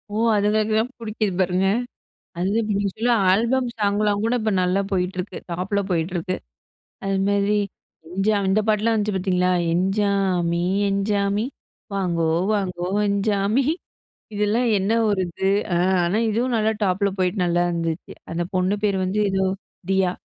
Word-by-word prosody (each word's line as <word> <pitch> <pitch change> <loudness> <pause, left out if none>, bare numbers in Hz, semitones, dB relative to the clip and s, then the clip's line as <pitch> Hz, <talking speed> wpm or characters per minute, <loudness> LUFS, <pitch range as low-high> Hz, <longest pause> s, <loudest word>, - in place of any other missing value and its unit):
ஓ! - - 0 0.2
அதுங்களுக்கு 215 +1 +1
தான் 240 +3 -1
புடிக்குது 215 -2 -2
பாருங்க. 185 +1 +2 0.7
அதுவே 195 +5 +1
இப்படி 200 -2 0
சொல்லி 240 +2 +1 0.2
ஆல்பம் 235 +6 +2
சாங்லாம் 205 0 +1
கூட 235 +2 +1
இப்ப 220 - 0
நல்லா 180 +2 +2
போயிட்ருக்கு. 180 +1 -2
டாப்ல 185 +4 -1
போயிட்ருக்கு. 175 +1 -1 0.7
அதுமாதிரி 200 +1 +1 0.5
"எஞ்சா" 195 +4 +1
இந்த 205 +3 +3
பாட்டுலாம் 215 +2 +2
வந்துச்சு 210 -1 0
பார்த்தீங்களா? 180 -1 +1 0.2
"எஞ்சாமி 190 -3 +1 0.3
எஞ்சாமி 200 +1 0 0.5
வாங்கோ 170 -4 0 0.3
வாங்கோ 180 -3 -2 0.2
எஞ்சாமி" 200 +4 +1 0.7
இதெல்லாம் 210 +4 +1
என்ன 195 +3 0 0.2
ஒரு 195 -2 +1
இது. 190 +3 -2 0.3
ஆ. - - +2 0.3
ஆனா, 180 +5 0
இதுவும் 240 +4 0
நல்லா 220 0 +2
டாப்புல 200 +1 +1
போயிட்டு 185 +1 +1
நல்லா 175 0 +2
இருந்துச்சு. 165 -1 -3 0.2
அந்த 170 +1 -1
பொண்ணு 185 +2 +2
பேர் 200 -2 +2
வந்து 190 +3 -1
ஏதோ 190 0 +1 0.5
தியா. 190 -2 +2
200 Hz, 135 wpm, -23 LUFS, 180-210 Hz, 0.7 s, இந்த